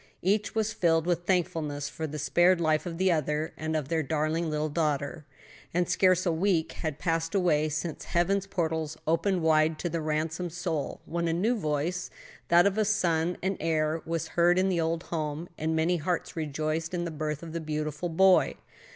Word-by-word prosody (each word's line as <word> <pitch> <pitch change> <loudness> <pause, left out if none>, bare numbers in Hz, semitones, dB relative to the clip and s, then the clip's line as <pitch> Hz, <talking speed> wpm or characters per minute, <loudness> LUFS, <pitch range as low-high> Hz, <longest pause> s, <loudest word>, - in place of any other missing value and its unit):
Each 205 +4 +1
was 220 -1 0
filled 165 -4 +2
with 175 0 0
thankfulness 155 -6 0
for 160 +2 -4
the 150 +1 -6
spared 175 +4 +3
life 155 +1 +1
of 165 -1 -5
the 190 +1 +3
other, 155 -1 -1
and 160 0 -3
of 150 -4 -1
their 160 +1 0
darling 155 +3 -1
little 155 0 -1
daughter. 150 -1 -2 0.5
And 175 -1 +2
scarce 185 -1 +3
a 175 - +2
week 165 -1 +1
had 155 -4 -4
passed 165 +1 -1
away 155 -5 +2
since 155 +1 -4
heaven's 195 +3 +1
portals 160 -4 -2
opened 165 +3 +1
wide 155 0 +3
to 175 - -3
the 165 0 -2
ransomed 160 +3 -2
soul, 170 -5 -3
when 170 0 -2
a 165 - +1
new 210 +9 +1
voice 160 -1 -2 0.4
that 175 +1 +6
of 200 +1 +2
a - - +4
son 175 -4 +1
and 190 0 0
heir 160 0 0
was 165 -1 -3
heard 175 +1 +3
in 190 +1 +3
the 175 -3 +1
old 165 +1 -1
home, 155 0 -3
and 160 +1 -1
many 165 +3 +2
hearts 170 +2 -2
rejoiced 155 +2 -2
in 175 0 -2
the 170 - -4
birth 150 0 -3
of 165 -1 -8
the 170 - -3
beautiful 155 +1 -3
boy. 190 +3 +4
165 Hz, 195 wpm, -28 LUFS, 155-175 Hz, 0.5 s, that